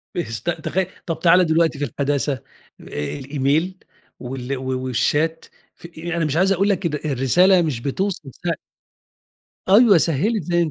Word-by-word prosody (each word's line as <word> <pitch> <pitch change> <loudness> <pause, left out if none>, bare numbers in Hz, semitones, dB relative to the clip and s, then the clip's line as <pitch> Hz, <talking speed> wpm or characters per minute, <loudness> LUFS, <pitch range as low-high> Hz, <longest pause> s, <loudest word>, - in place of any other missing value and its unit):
بيست 170 -2 -3
تخي 190 +2 -1 0.2
طَب 165 -2 -3
تعالَ 180 +2 +5
دلوقتي 160 -2 +1
في 145 - 0
الحداثة، 140 0 -1
آآ 130 - -7 0.8
الإيميل 145 +7 0 0.4
وال 130 +1 -5
و 130 0 -3
والChat، 160 +8 0 0.3
في 170 - -12
يعني 170 0 -2
مش 150 0 -1
عايز 190 +2 +3
أقول 195 +2 +2
لك 195 -2 0 0.2
إن 150 - -1
الرسالة 175 +9 +4
مش 150 -8 -1
بتوصل 165 +2 -3
سه 170 -1 +1 1.2
أيوه، 205 -1 +7
سهِّلت 180 - 0
زي 175 -2 +1
160 Hz, 145 wpm, -21 LUFS, 140-180 Hz, 1.2 s, أيوه